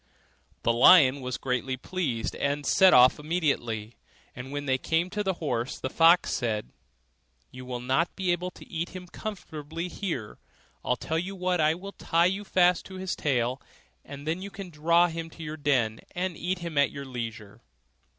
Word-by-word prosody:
The 115 - +3
lion 135 +1 +7
was 125 -1 -3
greatly 130 0 -2
pleased, 130 -7 -3
and 145 +1 -1
set 190 -1 +6
off 125 +3 +6
immediately; 140 -9 -2 0.4
and 130 +2 -8
when 145 0 -4
they 130 -1 +1
came 165 +6 0
to 210 +1 -2
the 190 -2 -1
horse, 125 -7 -2
the 130 - -4
fox 170 +2 +5
said, 110 -4 -2 0.8
'You 125 0 -10
will 125 -1 -4
not 135 +7 0
be 185 -2 0
able 175 +1 -1
to - - -15
eat 170 +2 -4
him 180 0 -7
comfortably 165 -4 -6
here; 165 - -5 0.4
I'll 125 - +1
tell 160 +5 -2
you 190 +3 -5
what 180 -2 0
I 155 +1 +3
will 195 +3 -8
tie 170 +1 +1
you 195 +3 0
fast 180 -3 +3
to 190 - -10
his 185 0 -3
tail, 130 -2 0 0.4
and 140 0 -10
then 165 +3 -1
you 200 - -6
can 195 -2 -9
draw 170 +3 +4
him 165 -1 -4
to 165 - -10
your 155 0 -5
den, 130 -7 +1 0.2
and 180 -1 -2
eat 180 +4 -2
him 170 -4 -3
at 140 - +4
your 140 -1 -7
leisure. 115 -5 -7
155 Hz, 185 wpm, -27 LUFS, 130-180 Hz, 0.8 s, lion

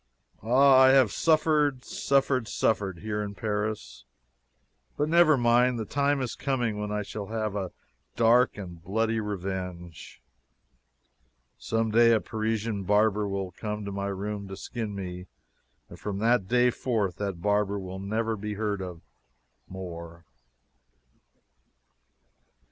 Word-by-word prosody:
Ah, 130 +3 +5
I 130 0 +7
have 130 -5 +5
suffered, 150 -4 +2
suffered, 135 -3 +1
suffered, 95 -7 -1
here 105 0 -2
in 100 -1 -5
Paris, 105 +1 -3 0.9
but 150 - +1
never 165 -2 +5
mind 120 +1 +3
the 110 - -3
time 140 +2 +1
is 120 - -3
coming 120 -6 -1
when 105 0 -3
I 105 0 -1
shall 100 0 -6
have 110 -2 -3
a 95 -3 -3 0.4
dark 120 +1 +4
and 90 -4 -8
bloody 110 +4 0
revenge. 90 -5 -6 1.4
Someday 115 +1 +3
a - - +2
Parisian 110 -1 -2
barber 105 +1 +2
will 95 -2 -3
come 105 0 -5
to 100 - -4
my 100 0 -3
room 100 +1 -4
to 95 0 -8
skin 110 -4 -5
me, 90 -1 -6 0.6
and - - -13
from 100 -2 -4
that 115 -2 +2
day 125 +2 +3
forth 110 -8 -1
that 100 -4 -3
barber 105 +1 +1
will 95 -1 -6
never 110 +3 -1
be 105 0 -5
heard 105 -2 -2
of 90 -3 -7 0.7
more. 85 -3 -8
105 Hz, 130 wpm, -27 LUFS, 100-120 Hz, 1.4 s, I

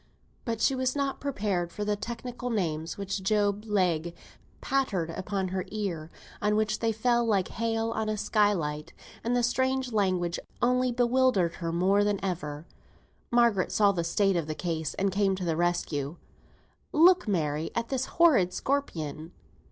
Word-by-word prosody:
But 230 -2 -2
she 270 - +3
was 260 0 0
not 280 -1 -1
prepared 200 -10 -2
for 210 +4 -4
the 210 0 +1
technical 240 +3 -5
names 165 -7 -2
which 200 0 -3
Job 205 +1 +1
Legh 175 -5 0 0.4
pattered 210 -12 0
down 185 +3 -5
on 195 -2 -1
her 185 0 -2
ear, 185 -7 -4 0.3
on 210 0 +2
which 215 0 0
they 225 -1 +1
fell 240 +2 +2
like 205 -5 +1
hail 225 0 -1
on 220 -1 -2
a 215 - -1
skylight; 170 -9 0 0.3
and 235 +2 0
the 245 - +2
strange 260 +1 0
language 185 -4 +1 0.2
only 250 +1 +2
bewildered 245 -7 +2
her 165 -2 -3
more 190 +4 +3
than 205 -1 0
ever. 150 -4 -4 0.6
Margaret 235 -5 +3
saw 205 -2 +4
the 175 -4 -2
state 195 +3 +2
of 165 -3 -1
the 155 - -3
case, 160 -3 -3
and 195 0 0
came 195 0 +2
to 185 -1 -4
the 165 -2 0
rescue. 165 -4 -1 0.8
"Look, 355 -1 +5
Mary, 155 -5 0
at 230 0 -2
this 265 -1 -1
horrid 265 - +5
scorpion. 165 - -3
205 Hz, 165 wpm, -28 LUFS, 175-235 Hz, 0.8 s, Look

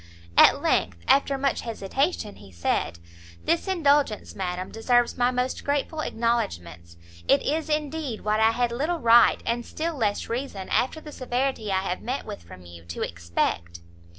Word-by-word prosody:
At - - +6
length, 85 0 +1
after 275 0 +3
much 275 -1 0
hesitation, 230 - -2
he 100 -2 -14
said 85 0 -1 0.5
"This 335 +3 +1
indulgence, 290 - +2
madam, 185 -1 -4
deserves 240 +2 +2
my 245 0 +2
most 250 +1 -2
grateful 290 +2 -1
acknowledgments; 85 - -2 0.3
it 275 - +4
is, 315 +2 -1
indeed, 300 -5 -2
what 215 0 0
I 220 0 +5
had 240 +1 0
little 300 +9 -1
right, 235 -4 +5
and 235 +1 -1
still 330 +7 -3
less 210 -6 -1
reason, 230 -6 -4
after 315 +5 0
the 300 - -10
severity 255 -5 -2
I 190 0 +2
have 185 -1 -3
met 255 +4 -3
with - - -7
from 90 +1 -13
you, 85 -1 -12
to 85 - -4
expect." 85 0 -2
235 Hz, 160 wpm, -25 LUFS, 185-280 Hz, 0.5 s, At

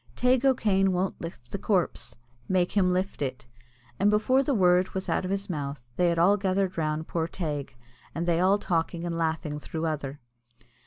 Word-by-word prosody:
"Teig 250 +1 +3
O'Kane 200 -8 +3
won't 185 +1 -1
lift 165 -8 -8
the 200 - -3
corpse 185 -4 -1 0.3
make 180 -1 +2
him 185 -3 +3
lift 185 -1 -1
it;" 130 -3 -3 0.5
and 205 - +4
before 220 +6 +3
the 275 -1 0
word 180 -2 +3
was 190 - -3
out - - 0
of - - -3
his 195 +1 -2
mouth 140 - -5
they 175 -1 +3
had 170 - 0
all 190 +5 +5
gathered 190 -1 0
round 155 0 -1
poor 165 -1 -1
Teig, 150 -7 -4 0.4
and 170 - -1
they 170 -1 +2
all 190 +3 +4
talking 170 -2 -1
and 170 -1 -2
laughing 160 -2 -2
through 160 +2 -4
other. 145 -3 -3
180 Hz, 190 wpm, -27 LUFS, 160-195 Hz, 0.5 s, all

